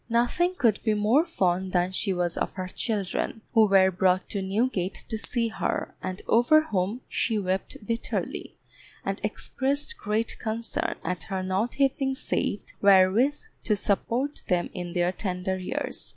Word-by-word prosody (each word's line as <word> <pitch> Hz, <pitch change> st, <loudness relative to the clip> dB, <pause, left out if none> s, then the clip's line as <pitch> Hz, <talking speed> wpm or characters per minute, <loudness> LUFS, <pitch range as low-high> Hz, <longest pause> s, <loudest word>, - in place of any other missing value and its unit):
Nothing 245 Hz, +11 st, +2 dB
could 230 Hz, -, +2 dB
be 220 Hz, -2 st, +2 dB
more 220 Hz, +9 st, +4 dB
fond 185 Hz, -, 0 dB
than 180 Hz, 0 st, +2 dB
she 195 Hz, +1 st, 0 dB
was 175 Hz, -2 st, 0 dB
of -, -, -2 dB
her 185 Hz, -1 st, -4 dB
children, 210 Hz, +2 st, -2 dB
who 220 Hz, -1 st, +6 dB
were 190 Hz, -1 st, +5 dB
brought 185 Hz, +1 st, +2 dB
to 200 Hz, -, -2 dB
Newgate 195 Hz, -1 st, 0 dB
to 220 Hz, -, 0 dB
see 230 Hz, +1 st, 0 dB
her, 220 Hz, -, -2 dB
and 185 Hz, +1 st, -5 dB
over 245 Hz, +7 st, +5 dB
whom 205 Hz, -1 st, -1 dB
she 225 Hz, -, 0 dB
wept 190 Hz, -1 st, -2 dB
bitterly, 230 Hz, +2 st, -3 dB, 0.5 s
and -, -, -2 dB
expressed 285 Hz, -, -2 dB
great 215 Hz, +2 st, -1 dB
concern 225 Hz, 0 st, -2 dB
at 180 Hz, +1 st, -2 dB
her 190 Hz, -1 st, -3 dB
not 190 Hz, +6 st, -1 dB
having 270 Hz, -1 st, +1 dB
saved 205 Hz, -, -2 dB
wherewith 200 Hz, +8 st, +5 dB, 0.2 s
to 215 Hz, -, +2 dB
support 235 Hz, +8 st, -1 dB
them 175 Hz, -2 st, +1 dB
in 175 Hz, -2 st, -5 dB
their 175 Hz, 0 st, +2 dB
tender 185 Hz, -1 st, -2 dB
years. 185 Hz, -, -3 dB
205 Hz, 155 wpm, -27 LUFS, 185-235 Hz, 0.5 s, who